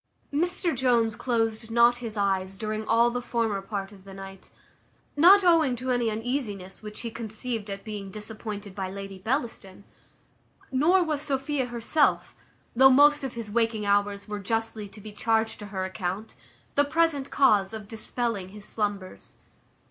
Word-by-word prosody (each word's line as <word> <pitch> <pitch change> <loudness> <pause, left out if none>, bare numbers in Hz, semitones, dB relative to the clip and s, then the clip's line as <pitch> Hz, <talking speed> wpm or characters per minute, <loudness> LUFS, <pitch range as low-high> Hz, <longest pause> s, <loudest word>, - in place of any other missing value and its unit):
Mr 345 +2 0
Jones 235 -4 +2
closed 225 -2 -1
not 235 +1 +4
his 225 -3 -6
eyes 195 -1 0
during 215 0 -3
all 235 +1 +4
the 245 +1 -2
former 230 -5 -1
part 195 0 -5
of 195 -2 -15
the 195 0 -11
night; 195 0 -10 0.7
not 370 +7 +7
owing 325 -7 +4
to 255 +2 -3
any 240 -2 +1
uneasiness 215 -4 -4
which 210 -1 -8
he 230 - -4
conceived 225 -1 -4
at 195 0 -5
being 210 -3 -6
disappointed 210 -1 -6
by 190 -1 -4
Lady 195 0 -7
Bellaston; 220 -4 -3 0.9
nor 330 +8 +4
was 305 -4 -1
Sophia 275 -2 -1
herself, 240 +5 +1 0.4
though 265 +2 +8
most 290 +2 +6
of 265 -3 -4
his 225 -3 -6
waking 225 -1 +1
hours 200 0 +1
were 210 -1 -4
justly 225 0 -2
to 210 - -13
be 215 +1 -9
charged 220 +1 0
to 210 - -7
her 190 -2 -3
account, 190 +2 -4 0.4
the 285 - +4
present 295 -2 +1
cause 210 -8 +3
of 220 -2 -7
dispelling 225 -3 -3
his 205 +1 -10
slumbers. 205 -3 -4
225 Hz, 160 wpm, -27 LUFS, 200-250 Hz, 0.9 s, though